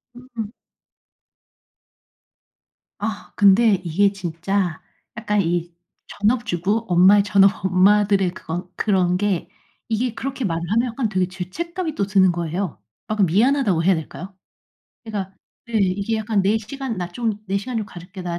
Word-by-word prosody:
음. 240 -4 -7 2.5
아. 210 -1 -5
근데 205 +2 +5
이게 200 +5 +2
진짜 180 -1 -2 0.4
약간 210 -3 0
이 175 -1 -1 0.3
전업주부 215 -1 0
엄마의 190 +3 +6
전업 200 0 +3
엄마들의 195 0 +3
그것 175 +2 -6
그런 185 -4 +1
게 190 -4 -1 0.4
이게 230 +1 -1
그렇게 270 -1 -4
말을 165 -2 -1
하면 235 +3 +2
약간 230 0 -1
되게 185 -2 0
죄책감이 315 - -5
또 200 - 0
드는 190 -2 +4
거예요. 170 - -3 0.3
아, 215 - -1
그 210 - +3
미안하다고 205 - +2
해야 190 0 +4
될까요? 185 +4 -7 0.7
그러니까 195 -4 -5 0.3
네 235 - -10
이게 200 +3 0
약간 215 -1 0
"내 200 +3 +2
시간 245 +1 -5
나 175 -1 -3
좀 225 +4 -2
내 195 +1 0
시간 245 +4 -5
좀 220 - -1
가질게. 180 -1 -10
나 175 -1 -3
200 Hz, 280 characters per minute, -22 LUFS, 180-220 Hz, 2.5 s, 엄마의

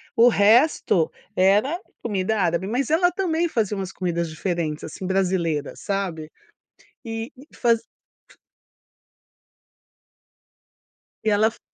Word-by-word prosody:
o 235 +1 +6
resto 210 - +3 0.2
era 210 - +3 0.2
comida 205 0 -1
árabe, 175 +2 0
mas 255 +6 -1
ela 355 +3 +3
também 345 -3 0
fazia 215 - -1
umas 190 -1 -4
comidas 170 -2 -2
diferentes, 155 -2 -3
assim, 185 +4 -7
brasileira, 180 -6 0
sabe? 180 -6 -4 0.7
E 225 +1 -5
e 275 +4 -15
fazi 230 -2 +2 0.5
f - - -21 2.9
E 220 - +2
ela 215 +2 +4
fo - - -19
200 Hz, 110 wpm, -23 LUFS, 180-235 Hz, 2.9 s, o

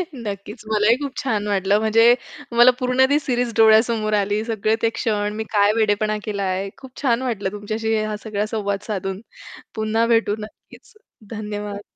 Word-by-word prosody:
नक्कीच 210 -1 -7
मलाही 215 +2 +4
खूप 275 -1 -5
छान 210 -5 -1
वाटलं, 200 +1 +2
म्हणजे 225 +2 +5 0.4
मला 245 +1 +8
पूर्ण 255 +1 +3
ती 290 +1 +3
सिरीज 245 -4 -1
डोळ्यासमोर 220 -1 +4
आली, 205 +1 +1
सगळे 220 -1 0
ते 230 - +3
क्षण, 210 -2 -1
मी 220 - -3
काय 205 0 +4
वेडेपणा 215 -1 +1
केलाय. 195 -2 -2
खूप 265 -2 -13
छान 245 -3 +1
वाटलं 205 -7 -2
तुमच्याशी 215 +2 -2
हा 215 0 -3
सगळा 210 -1 -2
संवाद 200 -1 -2
साधून, 195 -1 -4 0.5
पुन्हा 220 +1 +1
भेटू 210 -2 +1
नक्कीच. 215 - -13 0.4
धन्यवाद. 210 -2 -5
215 Hz, 155 wpm, -21 LUFS, 205-230 Hz, 0.5 s, मला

